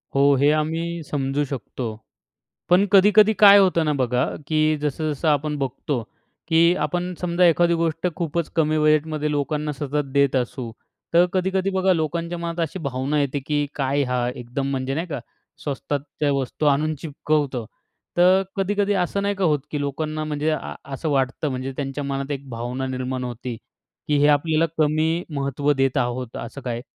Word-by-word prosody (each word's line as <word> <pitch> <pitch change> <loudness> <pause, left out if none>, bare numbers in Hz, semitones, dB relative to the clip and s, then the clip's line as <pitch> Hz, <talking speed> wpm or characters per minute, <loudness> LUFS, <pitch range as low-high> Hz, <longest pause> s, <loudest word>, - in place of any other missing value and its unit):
हो, 140 - +4
हे 140 +2 +4
आम्ही 165 +2 -1
समजू 140 0 0
शकतो, 130 -1 -5 0.8
पण 180 +3 +5
कधी-कधी 210 +2 +6
काय 200 0 +10
होतं 180 -4 +3
ना, 150 - +1
बघा 125 +1 +1 0.2
की 155 -1 +1 0.2
जसं-जसं 150 +1 -2
आपण 150 +1 +1
बघतो, 135 -1 -2 0.5
की 165 -1 +4 0.2
आपण 180 +1 -2
समजा 180 0 +2
एखादी 170 +1 +4
गोष्ट 165 +1 0
खूपच 170 -1 -2
कमी 155 -1 +2
बजेटमध्ये 155 0 +2
लोकांना 150 +1 -1
सतत 145 0 -3
देत 140 -1 +3
असू, 125 -1 -2 0.4
तर 170 +1 +6
कधी-कधी 190 +1 +1
बघा 185 0 +3
लोकांच्या 170 +2 -2
मनात 170 0 -4
अशी 180 +5 -8
भावना 135 +3 -1
येते 140 0 -1
की 145 -1 +1
काय 140 0 +1
हा 125 -1 +1
एकदम 125 +3 -4
म्हणजे 135 0 -2
नाही 165 +3 -2
का? 145 -5 -4 0.4
स्वस्तातच्या 145 0 -2
वस्तू 140 +2 -2
आणून 150 +2 +2
चिपकवतो. 145 -5 -1 0.5
तर 185 +2 +5
कधी-कधी 205 +1 +1
असं 200 +3 -3
नाही 200 0 0
का 190 -2 0
होत 150 -3 +2
की 150 - -2
लोकांना 155 +2 -3
म्हणजे 150 0 -1
आ 155 - -3 0.2
असं 155 +3 -3
वाटतं, 135 +2 0
म्हणजे 130 0 -4
त्यांच्या 140 0 -3
मनात 140 0 -3
एक 140 -1 -5
भावना 125 +3 -4
निर्माण 130 0 -3
होते, 120 0 -5 0.5
की 150 - +2
हे 145 - +5
आपल्याला 155 +2 +3
कमी 160 +3 +1
महत्त्व 140 +1 0
देत 135 0 +1
आहोत, 125 -1 -2
असं 140 - -9
काय? 120 -2 -4
150 Hz, 165 wpm, -23 LUFS, 135-165 Hz, 0.8 s, काय